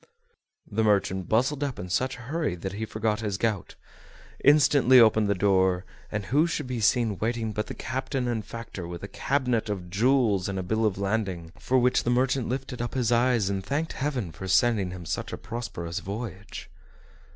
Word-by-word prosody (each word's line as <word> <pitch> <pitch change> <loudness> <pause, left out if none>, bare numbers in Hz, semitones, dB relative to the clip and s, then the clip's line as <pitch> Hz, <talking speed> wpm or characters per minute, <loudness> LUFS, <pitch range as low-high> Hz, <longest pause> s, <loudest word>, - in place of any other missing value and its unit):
The 110 +1 -1
merchant 95 -3 +1
bustled 130 +6 +1
up 140 -3 -3
in 90 - -6
such 130 +9 -1
a - - -11
hurry 145 - -2
that 95 +2 -5
he 110 +2 -3
forgot 110 0 -1
his 105 -4 -2
gout; 105 -4 -2 0.7
instantly 140 -3 +6
opened 110 -2 +5
the 100 - +1
door, 95 -1 +2 0.3
and 105 -2 -3
who 145 - +3
should 155 -4 -2
be 125 -2 -3
seen 110 -2 +2
waiting 115 0 -1
but 105 0 -3
the - - -6
captain 130 0 -3
and 115 -3 -1
factor, 105 -6 -7
with 85 +1 -7
a - - -4
cabinet 125 -1 -1
of 90 -4 -4
jewels, 110 -3 +2
and 95 - -3
a 95 - -2
bill 110 +4 +1
of 95 - -2
lading, 95 -5 -2
for 130 - +1
which 125 0 +3
the - - -1
merchant 130 0 +1
lifted 130 -1 -4
up 120 - -4
his 120 -3 +1
eyes 120 -3 +3
and 100 -1 -2
thanked 145 +10 -2
heaven 130 - -2
for 95 - -8
sending 100 0 +3
him 90 -1 -8
such - - -3
a - - -4
prosperous 100 -7 -5
voyage. 105 0 -7
110 Hz, 195 wpm, -27 LUFS, 95-125 Hz, 0.7 s, instantly